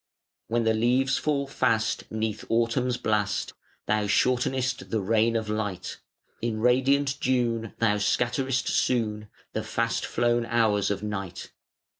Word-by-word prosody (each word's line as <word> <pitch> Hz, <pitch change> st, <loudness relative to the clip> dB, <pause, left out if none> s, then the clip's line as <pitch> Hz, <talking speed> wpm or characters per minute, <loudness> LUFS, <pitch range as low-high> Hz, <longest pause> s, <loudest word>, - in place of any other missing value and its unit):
When 115 Hz, +1 st, 0 dB
the 110 Hz, 0 st, +3 dB
leaves 125 Hz, +4 st, +2 dB
fall 145 Hz, -2 st, 0 dB
fast, 120 Hz, -5 st, 0 dB
'neath 110 Hz, -1 st, -3 dB
Autumn's 120 Hz, +2 st, +1 dB
blast, 105 Hz, -3 st, -1 dB, 0.3 s
Thou 105 Hz, 0 st, +1 dB
shortenest 130 Hz, +4 st, +1 dB
the 110 Hz, -, 0 dB
reign 110 Hz, +3 st, +2 dB
of 110 Hz, -1 st, -1 dB
light. 105 Hz, -4 st, -3 dB, 0.4 s
In 115 Hz, -2 st, -2 dB
radiant 135 Hz, +4 st, +2 dB
June 120 Hz, -3 st, 0 dB
Thou 105 Hz, -2 st, +2 dB
scatterest 125 Hz, +4 st, 0 dB
soon 105 Hz, -4 st, 0 dB, 0.2 s
The -, -, -1 dB
fast 115 Hz, 0 st, -1 dB
flown 120 Hz, -1 st, +1 dB
hours 110 Hz, -4 st, +2 dB
of 100 Hz, 0 st, -2 dB
night. 95 Hz, -4 st, -5 dB
115 Hz, 130 wpm, -26 LUFS, 105-125 Hz, 0.4 s, the